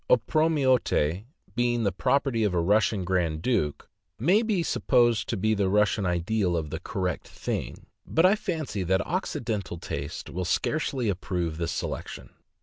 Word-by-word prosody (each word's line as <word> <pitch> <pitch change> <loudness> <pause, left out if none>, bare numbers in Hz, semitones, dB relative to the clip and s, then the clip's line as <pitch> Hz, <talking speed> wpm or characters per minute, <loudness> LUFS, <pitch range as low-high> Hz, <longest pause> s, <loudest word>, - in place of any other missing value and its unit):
Opromiote, 130 - +2 0.3
being 120 -1 +1
the 100 - +2
property 135 -3 +1
of 100 -4 +1
a - - +3
Russian 100 +2 +2
grand 85 -4 0
duke, 75 - 0 0.3
maybe 195 - +2
supposed 120 -7 +2
to - - -1
be 110 +3 +1
the 100 -2 +1
Russian 105 0 +2
ideal 90 +1 0
of 75 -2 -4
the - - -3
"correct 90 -3 -3
thing;" - - -5 0.2
but 165 - +3
I 190 - +6
fancy 160 - -3
that 95 +1 +1
Occidental 105 -7 -3
taste 70 -3 -5
will 90 - -3
scarcely 130 - 0
approve 90 -4 -2
this 85 -1 -1
selection. - - -5
105 Hz, 145 wpm, -27 LUFS, 90-130 Hz, 0.3 s, I